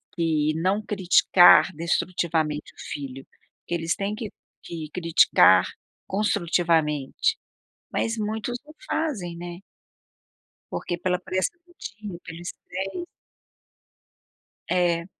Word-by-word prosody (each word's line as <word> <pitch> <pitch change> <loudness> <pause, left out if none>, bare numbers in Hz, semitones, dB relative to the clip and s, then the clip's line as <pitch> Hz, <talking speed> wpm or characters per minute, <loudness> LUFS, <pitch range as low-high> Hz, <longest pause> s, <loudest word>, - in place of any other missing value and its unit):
que 155 -3 +1
não 190 +6 +1
criticar 185 -3 +6
destrutivamente 165 -2 -1
o - - -35
filho. 135 -2 -6 0.4
Que 175 - -1
eles 165 0 -1
têm 200 +1 -2
que 220 -2 -6 0.3
que 160 -3 -7
criticar 170 -1 +5 0.4
construtivamente. 170 - +1 0.6
Mas, 230 0 0
muitos 220 +3 -2
não 305 - -14
fazem, 210 - -2
né. 175 +1 -7 1.1
Porque 175 - -3
pela 180 +1 0
pressão 185 - -2
do 350 - -22
dia, 195 -3 -8
que - - -8
eles 175 +2 -6 0.2
têm 195 - -4 1.6
É. 175 -2 +1
175 Hz, 105 wpm, -25 LUFS, 165-205 Hz, 1.6 s, criticar